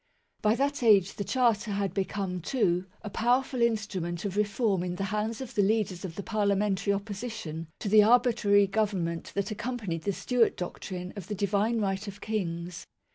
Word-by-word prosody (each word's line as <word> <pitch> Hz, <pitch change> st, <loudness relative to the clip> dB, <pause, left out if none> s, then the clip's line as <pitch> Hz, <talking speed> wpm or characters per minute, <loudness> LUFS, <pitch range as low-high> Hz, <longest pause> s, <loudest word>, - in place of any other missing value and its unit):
By 215 Hz, +1 st, +3 dB
that 285 Hz, +2 st, 0 dB
age 205 Hz, -5 st, +5 dB
the 200 Hz, -, -4 dB
Charter 230 Hz, -3 st, +1 dB
had 195 Hz, -3 st, -1 dB
become, 190 Hz, -2 st, -2 dB
too, 180 Hz, -, +1 dB, 0.2 s
a 210 Hz, -, -5 dB
power 245 Hz, +6 st, +3 dB
ful 255 Hz, -2 st, -4 dB
instrument 200 Hz, -6 st, -1 dB
of 200 Hz, -1 st, -3 dB
reform 205 Hz, -2 st, +1 dB
in 180 Hz, 0 st, -3 dB
the 195 Hz, -, -3 dB
hands 215 Hz, +3 st, -1 dB
of 260 Hz, -1 st, -7 dB
the 205 Hz, -, +2 dB
leaders 200 Hz, -3 st, +1 dB
of 175 Hz, -4 st, -6 dB
the 200 Hz, -, -5 dB
parliamentary 200 Hz, -2 st, +1 dB
opposition 200 Hz, -5 st, -4 dB
to -, -, -5 dB
the 210 Hz, +1 st, +7 dB
arbitrary 225 Hz, -3 st, +4 dB
Government 195 Hz, -5 st, -1 dB
that 200 Hz, +1 st, -1 dB
accompanied 215 Hz, -7 st, -3 dB
the 200 Hz, -, -1 dB
Stewart 240 Hz, +4 st, +1 dB
doctrine 180 Hz, 0 st, -5 dB
of 195 Hz, -4 st, -7 dB
the 210 Hz, -, -3 dB
Divine 205 Hz, +3 st, +1 dB
Right 195 Hz, 0 st, -1 dB
of 200 Hz, 0 st, -7 dB
Kings. 175 Hz, -5 st, -4 dB
205 Hz, 180 wpm, -28 LUFS, 190-220 Hz, 0.2 s, the